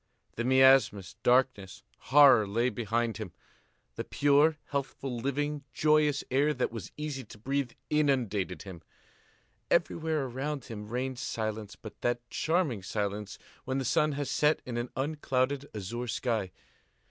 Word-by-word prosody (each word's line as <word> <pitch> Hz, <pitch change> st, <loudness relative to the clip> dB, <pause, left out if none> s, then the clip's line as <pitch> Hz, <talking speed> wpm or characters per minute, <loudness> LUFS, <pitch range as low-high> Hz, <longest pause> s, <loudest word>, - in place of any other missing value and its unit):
The 120 Hz, -, -2 dB
miasmas, 130 Hz, -6 st, +4 dB
darkness, 125 Hz, -6 st, +1 dB, 0.3 s
horror 135 Hz, -7 st, +7 dB
lay 115 Hz, +5 st, +1 dB
behind 115 Hz, 0 st, -1 dB
him. 110 Hz, -6 st, -7 dB, 0.6 s
The -, -, -2 dB
pure, 145 Hz, +2 st, +3 dB
healthful, 135 Hz, -2 st, -3 dB
living, 140 Hz, +4 st, -2 dB
joyous 150 Hz, -2 st, +3 dB
air 145 Hz, +3 st, +2 dB
that 125 Hz, -, -1 dB
was 115 Hz, -3 st, -7 dB
easy 150 Hz, -3 st, -4 dB
to 105 Hz, -, -13 dB
breathe 135 Hz, +3 st, -2 dB, 0.2 s
inundated 125 Hz, -11 st, 0 dB
him. 95 Hz, -4 st, -9 dB, 0.9 s
Everywhere 160 Hz, -3 st, +1 dB
around 135 Hz, +3 st, -4 dB
him 105 Hz, -3 st, -7 dB
reigned 125 Hz, +1 st, -3 dB
silence, 110 Hz, -3 st, -4 dB
but 110 Hz, -, -12 dB
that 120 Hz, 0 st, -1 dB
charming 160 Hz, -, 0 dB
silence 100 Hz, +1 st, -3 dB, 0.3 s
when 130 Hz, +1 st, -2 dB
the 135 Hz, -, -2 dB
sun 150 Hz, +5 st, +2 dB
has 140 Hz, 0 st, -3 dB
set 150 Hz, +1 st, +3 dB
in 125 Hz, -, -5 dB
an 120 Hz, +1 st, -3 dB
unclouded 140 Hz, -1 st, -1 dB
azure 115 Hz, +5 st, -4 dB
sky. 110 Hz, -5 st, -1 dB
130 Hz, 135 wpm, -30 LUFS, 110-145 Hz, 0.9 s, horror